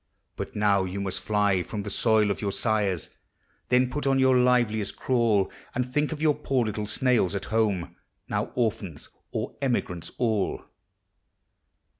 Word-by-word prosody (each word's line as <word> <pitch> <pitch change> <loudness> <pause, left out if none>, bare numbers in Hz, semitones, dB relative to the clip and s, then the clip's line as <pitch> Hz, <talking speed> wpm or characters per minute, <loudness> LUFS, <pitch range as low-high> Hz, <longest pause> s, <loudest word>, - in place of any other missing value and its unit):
But - - -6
now 100 -2 +3
vou 95 +1 -4
must 95 -1 -2
fly 105 -3 +2
from 105 +3 -5
the 105 - -5
soil 110 0 +3
of - - -3
jour 100 -2 -1
sires; 105 -6 0 0.6
Then 125 0 +4
put 145 0 -2
on 135 0 +3
your 130 -1 +4
liveliest 120 -5 +2
crawl, 115 -6 +2 0.2
And 125 0 0
think 150 +4 0
of 155 -1 -4
your 155 -2 +5
poor 130 -4 0
little 105 -1 -3
snails 115 -4 +1
at 100 - -3
home, 105 -6 0 0.3
Now - - -1
orphans 105 - -2 0.2
or - - -3
emigrants 115 - -1
all. 110 -5 0
110 Hz, 155 wpm, -26 LUFS, 100-125 Hz, 0.6 s, your